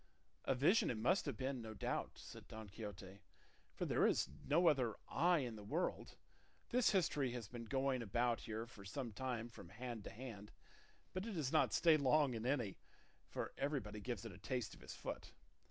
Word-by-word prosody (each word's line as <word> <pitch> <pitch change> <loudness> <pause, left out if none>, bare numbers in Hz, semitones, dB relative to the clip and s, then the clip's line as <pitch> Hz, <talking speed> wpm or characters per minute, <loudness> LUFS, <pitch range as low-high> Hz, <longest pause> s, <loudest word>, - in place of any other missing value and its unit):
"A 135 - +3
vision 155 - +5
it 120 - 0
must 165 - +3
have 135 -6 -2
been, 130 0 -1
no 110 -1 -6
doubt," - - -1
said - - -10
Don 110 -1 -7
Quixote, 100 -2 -7 0.6
"for - - -1
there - - +4
is - - +3 0.2
no 165 +5 +5
other 130 -8 +4
I 175 +4 +4
in 120 -4 -3
the 105 - -8
world; 100 - -1 0.5
this 250 -1 +4
history 150 - +2
has 120 -4 -4
been 120 +2 -7
going 135 0 +1
about 120 +2 +1
here 110 +1 -4
for 110 -4 -12
some 115 +5 -4
time 120 0 -2
from 100 -7 -11
hand 115 +2 -5
to - - -4
hand, 110 -4 -8 0.6
but 185 +4 -2
it 225 - -3
does 150 -7 -1
not 155 - +4
stay 165 -2 +6
long 140 -1 +4
in 115 +1 -2
any, 125 -8 0 0.5
for - - -4
everybody 135 -7 -1
gives 120 -1 -3
it 115 - -5
a 95 - -11
taste 125 +1 -2
of - - -13
his - - -7
foot. - - -6
125 Hz, 195 wpm, -40 LUFS, 110-140 Hz, 0.6 s, stay